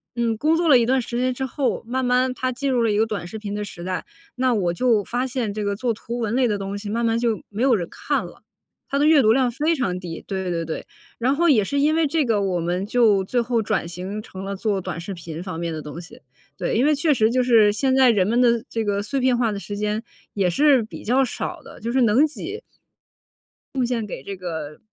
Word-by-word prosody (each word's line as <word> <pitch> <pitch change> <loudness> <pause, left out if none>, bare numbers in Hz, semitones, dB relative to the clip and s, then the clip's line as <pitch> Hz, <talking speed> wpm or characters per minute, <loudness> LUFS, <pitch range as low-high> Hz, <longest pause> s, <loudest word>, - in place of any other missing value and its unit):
嗯， 235 -2 0
工 315 +6 +2
作 340 -1 +1
了 260 -5 +7
一 230 - +2
段 260 +2 +2
时 240 0 -5
间 255 0 +1
之 265 +1 -3
后， 265 -1 -1
慢 260 +2 -2
慢 250 +1 +2
它 255 0 -2
进 270 +2 -2
入 245 -2 +2
了 225 - +2
一 205 - +1
个 220 - +3
短 200 -5 -4
视 220 - -7
频 205 -1 -5
的 210 0 -3
时 175 -3 -8
代。 185 0 -3 0.3
那 255 0 +1
我 180 -6 +1
就 225 -1 +2
发 250 +5 -2
现 235 -5 -2
这 210 0 -3
个 200 0 -1
做 235 +2 -1
图 235 +2 -6
文 225 -2 -2
类 255 -2 +3
的 210 -2 0
东 195 0 -4
西 205 0 -6
慢 230 +2 0
慢 225 0 +1
就 230 -3 0
没 210 +3 -5
有 260 -2 +4
人 175 -5 -2
看 - - -2
了， - - -13 0.5
它 280 - 0
的 290 - +3
阅 310 -3 +6
读 220 -1 +4
量 250 0 +3
非 305 +7 +1
常 185 - -1
低， 170 -3 -7
对 190 -2 -3
对 165 -1 -2
对。 160 - -4 0.4
然 260 +4 +2
后 340 +2 +2
也 230 -9 +5
是 280 +7 -1
因 300 +2 +3
为 320 -2 +2
这 310 0 +1
个， 220 -4 +1
我 185 -3 0
们 175 +3 -1
就 215 -5 +3
最 245 +5 0
后 235 -1 +1
转 205 -5 -1
型 185 +4 -5
成 190 -2 -9
了 195 0 -4
做 200 -1 -1
短 165 - -5
视 190 +3 -6
频 165 -1 -7
方 180 -4 -5
面 170 -1 -2
的 155 -1 -5
东 150 +3 -7
西。 230 +9 -13 0.4
对， - - -2
因 235 - +3
为 300 0 +4
确 300 +1 +2
实 220 -3 +3
就 250 +1 +2
是 225 -4 +5
现 260 +4 +1
在 260 -2 +6
人 200 -5 +3
们 240 +3 +2
的 235 0 +3
这 225 -1 -2
个 205 -1 -1
碎 275 +5 -2
片 255 -1 +2
化 230 -3 +1
的 200 - -4
时 205 0 -6
间 210 +1 -1 0.3
也 195 -3 +1
是 280 - +4
比 215 - -9
较 260 +4 +3
少 330 +6 -4
的， - - -13
就 230 +1 -3
是 260 0 +2
能 235 +6 +5
挤 390 +8 -6 1.1
贡 255 -2 +1
献 235 -3 -1
给 135 - -7
这 200 - -6
个 160 -5 -6
230 Hz, 285 characters per minute, -23 LUFS, 200-255 Hz, 1.1 s, 了